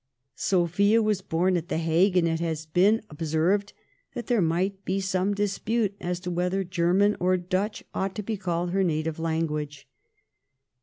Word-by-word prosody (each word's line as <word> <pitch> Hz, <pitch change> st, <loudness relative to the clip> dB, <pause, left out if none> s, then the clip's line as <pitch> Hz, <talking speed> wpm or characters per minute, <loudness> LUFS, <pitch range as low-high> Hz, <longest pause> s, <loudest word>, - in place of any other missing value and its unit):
Sophia 190 Hz, +8 st, +2 dB
was 215 Hz, -3 st, +1 dB
born 180 Hz, +3 st, +1 dB
at 170 Hz, -1 st, -2 dB
the -, -, -1 dB
Hague, 170 Hz, +4 st, +2 dB
and 170 Hz, -2 st, +3 dB
it 165 Hz, 0 st, 0 dB
has 160 Hz, -2 st, -3 dB
been 195 Hz, +8 st, +3 dB
observed 165 Hz, +7 st, 0 dB, 0.4 s
that 240 Hz, -, -4 dB
there 240 Hz, -5 st, +2 dB
might 185 Hz, +4 st, 0 dB
be 190 Hz, +1 st, -1 dB
some 190 Hz, +1 st, 0 dB
dispute 205 Hz, +1 st, -1 dB
as 175 Hz, 0 st, -2 dB
to 180 Hz, 0 st, -5 dB
whether 180 Hz, +2 st, 0 dB
German 185 Hz, +3 st, +2 dB
or 185 Hz, +1 st, +2 dB
Dutch 185 Hz, +4 st, -2 dB
ought 190 Hz, 0 st, -2 dB
to 210 Hz, -, -4 dB
be 220 Hz, +2 st, -2 dB
called 175 Hz, -3 st, -2 dB
her 195 Hz, +1 st, +2 dB
native 155 Hz, -2 st, -1 dB
tongue. 160 Hz, -2 st, -1 dB
180 Hz, 165 wpm, -26 LUFS, 165-200 Hz, 0.4 s, and